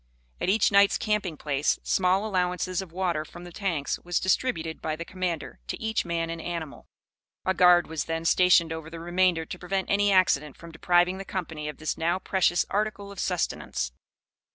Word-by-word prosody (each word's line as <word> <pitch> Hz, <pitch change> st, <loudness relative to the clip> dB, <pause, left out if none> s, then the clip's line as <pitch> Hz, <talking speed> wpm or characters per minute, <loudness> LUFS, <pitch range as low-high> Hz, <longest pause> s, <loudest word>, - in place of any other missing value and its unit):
At -, -, -1 dB
each 210 Hz, +2 st, +3 dB
night's 200 Hz, 0 st, +5 dB
camping 210 Hz, -7 st, -1 dB
place, 145 Hz, 0 st, 0 dB
small 190 Hz, +2 st, +2 dB
allowances 185 Hz, -2 st, -1 dB
of 190 Hz, -4 st, -10 dB
water 175 Hz, -3 st, -1 dB
from 175 Hz, +2 st, -12 dB
the 175 Hz, -, -10 dB
tanks 170 Hz, -7 st, -2 dB
was 175 Hz, 0 st, -1 dB
distributed 170 Hz, -5 st, -1 dB
by 155 Hz, -1 st, -2 dB
the 170 Hz, +2 st, -6 dB
commander 180 Hz, -, -4 dB
to -, -, -4 dB
each 220 Hz, -2 st, -1 dB
man 165 Hz, -1 st, -2 dB
and 165 Hz, 0 st, -5 dB
animal. 165 Hz, -4 st, -6 dB, 0.6 s
A 190 Hz, -, +2 dB
guard 180 Hz, -1 st, +6 dB
was 160 Hz, -1 st, -4 dB
then 165 Hz, 0 st, -3 dB
stationed 170 Hz, -2 st, +4 dB
over 160 Hz, -1 st, -7 dB
the 165 Hz, 0 st, -8 dB
remainder 175 Hz, -1 st, +1 dB
to 180 Hz, -, -8 dB
prevent 190 Hz, +1 st, -2 dB
any 205 Hz, 0 st, +3 dB
accident 150 Hz, -7 st, +2 dB
from 170 Hz, 0 st, -11 dB
depriving 175 Hz, +3 st, +2 dB
the -, -, -4 dB
company 160 Hz, -6 st, -5 dB
of 150 Hz, -, -8 dB
this 155 Hz, -1 st, -3 dB
now 170 Hz, +2 st, +1 dB
precious 185 Hz, -2 st, +1 dB
article 205 Hz, 0 st, -2 dB
of 200 Hz, -, -10 dB
sustenance. 170 Hz, -, -2 dB
175 Hz, 185 wpm, -27 LUFS, 165-190 Hz, 0.6 s, guard